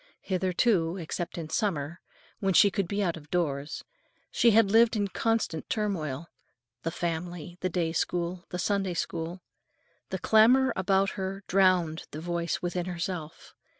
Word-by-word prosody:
Hitherto, 185 Hz, -1 st, +1 dB
except 175 Hz, 0 st, -4 dB
in 160 Hz, -2 st, -6 dB
summer, 170 Hz, -5 st, -1 dB, 0.4 s
when 195 Hz, -3 st, +1 dB
she 200 Hz, -, +7 dB
could 195 Hz, -2 st, -1 dB
be 205 Hz, +2 st, -1 dB
out 170 Hz, -3 st, -1 dB
of 150 Hz, -2 st, -14 dB
doors, 145 Hz, -5 st, -2 dB, 0.5 s
she 235 Hz, -, +4 dB
had 220 Hz, -2 st, +5 dB
lived 230 Hz, +2 st, +5 dB
in 205 Hz, -2 st, +1 dB
constant 225 Hz, -7 st, -1 dB
turmoil; 170 Hz, -9 st, -2 dB, 0.6 s
the 165 Hz, -, -2 dB
family, 175 Hz, +1 st, -4 dB
the 185 Hz, -, 0 dB
day 170 Hz, -2 st, 0 dB
school, 175 Hz, +2 st, -1 dB
the 180 Hz, -, -4 dB
Sunday 195 Hz, -1 st, 0 dB
School. 170 Hz, +2 st, -4 dB, 0.7 s
The -, -, -2 dB
clamor 245 Hz, +5 st, +5 dB
about 190 Hz, +1 st, +2 dB
her 195 Hz, 0 st, -4 dB
drowned 180 Hz, -4 st, +2 dB
the 150 Hz, -, -7 dB
voice 170 Hz, +1 st, -2 dB
within 175 Hz, 0 st, -2 dB
herself. 170 Hz, -3 st, -5 dB
180 Hz, 150 wpm, -28 LUFS, 165-195 Hz, 0.7 s, she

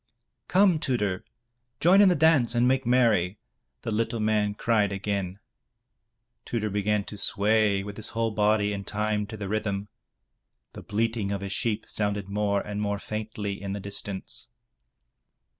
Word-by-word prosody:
"Come, 185 Hz, -3 st, +4 dB
Tudur, 105 Hz, -, -1 dB, 0.6 s
join 185 Hz, +4 st, +6 dB
in 200 Hz, -, +7 dB
the 180 Hz, -, +3 dB
dance 145 Hz, -7 st, +4 dB
and 120 Hz, +1 st, +4 dB
make 130 Hz, -1 st, +1 dB
merry,'* 110 Hz, -7 st, +3 dB, 0.5 s
the 115 Hz, -, -3 dB
little 115 Hz, +2 st, -1 dB
man 105 Hz, -1 st, +1 dB
cried 105 Hz, -3 st, +2 dB
again. 100 Hz, -1 st, -2 dB, 1.1 s
Tudur 110 Hz, -3 st, -2 dB
began 105 Hz, +1 st, +1 dB
to 105 Hz, 0 st, -8 dB
sway 105 Hz, -1 st, +2 dB
with 100 Hz, 0 st, -8 dB
his 110 Hz, -, -4 dB
whole 115 Hz, 0 st, -1 dB
body 105 Hz, -1 st, +2 dB
in 100 Hz, 0 st, -4 dB
time 105 Hz, 0 st, -1 dB
to 110 Hz, 0 st, -7 dB
the 100 Hz, -1 st, -5 dB
rhythm. 100 Hz, -1 st, -2 dB, 0.8 s
The -, -, -8 dB
bleating 110 Hz, -1 st, -1 dB
of 100 Hz, -1 st, -2 dB
his 100 Hz, 0 st, -4 dB
sheep 110 Hz, 0 st, -1 dB
sounded 105 Hz, -2 st, -2 dB
more 100 Hz, 0 st, 0 dB
and 105 Hz, 0 st, -4 dB
more 100 Hz, -1 st, -1 dB
faintly 105 Hz, -1 st, -5 dB
in 100 Hz, -1 st, -4 dB
the 100 Hz, -, -4 dB
distance. 100 Hz, -1 st, -5 dB
105 Hz, 155 wpm, -27 LUFS, 100-115 Hz, 1.1 s, in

